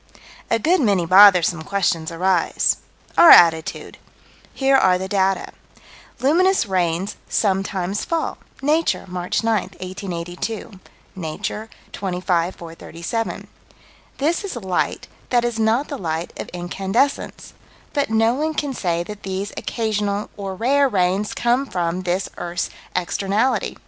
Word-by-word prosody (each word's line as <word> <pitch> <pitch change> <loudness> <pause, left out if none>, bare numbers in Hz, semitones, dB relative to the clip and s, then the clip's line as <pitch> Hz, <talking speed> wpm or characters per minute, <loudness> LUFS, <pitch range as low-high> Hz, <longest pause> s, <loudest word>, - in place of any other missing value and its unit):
A 230 - +3
good 335 - +2
many 200 -8 +2
bothersome 185 -2 +6
questions 175 -3 -1
arise 180 +1 +1 0.4
Our 340 - +9
attitude: 165 +1 +5 0.5
Here 270 0 +2
are 185 -8 +4
the 190 +1 -4
data: 195 -1 0 0.7
Luminous 350 +6 +3
rains 185 0 -1
sometimes 195 -1 0
fall 330 -1 -2 0.2
(Nature, 310 -2 +1
March 180 +3 -2
9, 225 -3 +2 0.2
1882; 185 +2 -5 0.4
Nature, 190 +5 -5 0.2
25 180 -2 -1
437). 170 +6 -5 0.7
This 320 +7 0
is 400 - -5
light 190 -6 -2 0.2
that 240 -1 +2
is 235 -2 -2
not 225 +6 +2
the 285 - -6
light 165 -1 -3
of - - -5
incandescence, 195 +9 -2 0.4
but 285 -4 0
no 225 +1 +3
one 310 +4 -2
can 285 -2 -2
say 170 -7 -1
that 210 +3 -9
these 195 +1 -4
occasional, 210 -2 -2
or 195 -2 -5
rare, 270 +6 +2
rains 190 0 0
come 245 +3 +1
from 175 -2 -2
this 185 +1 -1
earth's 175 0 -3 0.2
externality. 200 +7 0
195 Hz, 125 wpm, -21 LUFS, 180-235 Hz, 0.7 s, Our